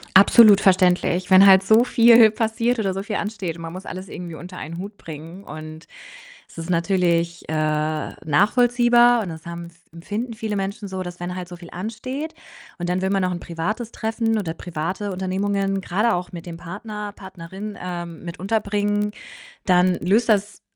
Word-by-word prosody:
Absolut 200 +1 +8
verständlich, 180 -1 +3
wenn 190 +1 +8
halt 190 -1 +8
so 220 +4 +5
viel 230 -2 +6
passiert 230 +2 0
oder 195 -3 0
so 195 +1 -4
viel 210 0 -3
ansteht 195 -6 -4
und - - -10
man 165 0 -7
muss 185 +2 -8
alles 185 +1 -7
irgendwie 175 -3 -8
unter 180 +3 -10
einen 165 +2 -7
Hut 200 +3 -7
bringen 165 +5 -10
und 155 -1 -9 0.6
es - - -16
ist 165 +2 -5
natürlich, 170 -1 0
äh, - - -3
nachvollziehbar, 210 - +2
und 190 - -5
das 160 0 -10
haben 170 0 -6
f 170 0 -18
empfinden 210 +8 -5
viele 215 -2 -3
Menschen 200 +1 -4
so, 190 -1 -5
dass 175 -1 -8
wenn 175 +1 -5
halt 180 -1 -6
so 175 - -9
viel 175 -1 -12
ansteht 255 - -5 0.4
und 175 0 -3
dann 180 +1 0
will 190 0 -1
man 195 -1 +1
noch 180 0 0
'n 175 - -4
privates 205 +9 -4
Treffen 225 0 -1
oder 170 -6 -3
private 180 +5 -4
Unternehmungen, 195 +1 -1
grade 210 +6 +1
auch 175 0 -4
mit 170 -1 -8
dem 170 -1 -7
Partner, 210 +4 -7
Partnerin, 190 +2 -9
ähm, 175 -2 -6
mit 170 0 -7
unterbringen, 205 +1 0 0.5
dann 180 -1 +4
löst 215 +7 +1
das 205 -1 0
190 Hz, 180 wpm, -22 LUFS, 175-210 Hz, 0.6 s, Absolut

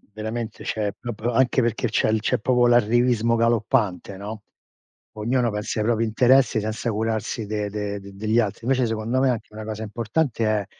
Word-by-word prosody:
Veramente, 110 +1 -5
cioè 105 -1 -2
è - - -1
proprio 120 0 -4
anche 130 +2 +3
perché 120 +1 0
c'è 110 0 +2
c'è 110 - +1
proprio 125 +1 +3
l'arrivismo 120 0 +3
galoppante, 115 -4 +1
no, 105 +2 -7 0.7
ognuno 120 +3 0
pensa 105 +1 -3
ai 105 - 0
propri 115 0 +2
interessi 125 +1 +4
senza 110 +2 -2
curarsi 110 +1 -2
de 105 0 -2
de 105 0 -4
degli 100 +3 -1
altri. 110 0 -2
Invece 130 0 +2
secondo 115 +2 -1
me 135 0 +3
anche 115 -3 -5
una 110 - -6
cosa 110 0 -5
importante 115 +3 -1
è 105 -2 +1
110 Hz, 170 wpm, -23 LUFS, 105-120 Hz, 0.7 s, interessi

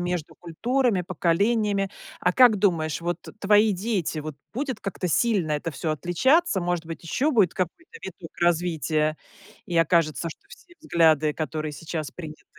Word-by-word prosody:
между 175 -3 -3
культурами, 230 +4 0
поколениями. 195 +4 +1 0.3
А 180 - +2
как 245 -2 +6
думаешь, 165 -6 +1
вот 175 +1 -2 0.2
твои 210 +1 +4
дети, 190 -5 -2
вот 155 -1 -5 0.2
будет 260 -1 -3
как-то 195 -2 -4
сильно 190 -4 +1
это 150 +3 -2
всё 155 +2 -2
отличаться? 215 - +2
Может 175 -1 -1
быть, 165 +1 -8
ещё 270 - 0
будет 210 - +3
какой-то 325 - -5
виток - - -9
развития, 160 -3 +1 0.5
и 175 - -3
окажется, 165 -2 +2
что - - -11
все 350 -7 -16
взгляды, 160 - +3
которые 155 -1 -3
сейчас 155 0 -5
приняты, 155 -3 -10
175 Hz, 150 wpm, -25 LUFS, 160-210 Hz, 0.5 s, как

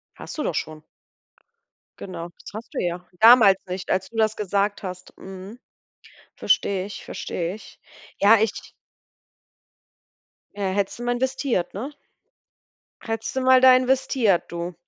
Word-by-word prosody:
Hast - - -9
du 300 - -2
doch 165 - -2
schon. 155 +1 -4 1.2
Genau, 175 -3 -7
das - - -11
hast 220 +2 -9
du - - -3
ja 175 0 -3
damals 225 -4 +8
nicht, 185 +1 -6
als 190 0 0
du 230 - -11
das 220 -1 +2
gesagt 205 0 -1
hast, 185 -1 -8
mhm. 190 +4 -10 0.8
Verstehe 190 -2 +1
ich, 200 -1 -9
verstehe 175 +2 -4
ich. 220 - -15 0.4
Ja, 210 +3 +7
ich 220 -1 -2 1.9
Ja, 200 -2 -1
hättest 195 +3 -2
du 240 - -6
mal 245 0 0
investiert, 260 -6 -1
ne? 250 +9 -5 1.1
Hättest 225 +1 -4
du 265 - 0
mal 260 0 +5
da 260 -1 +9
investiert, 255 -6 +2
du. 170 +1 -5
205 Hz, 140 wpm, -23 LUFS, 185-240 Hz, 1.9 s, da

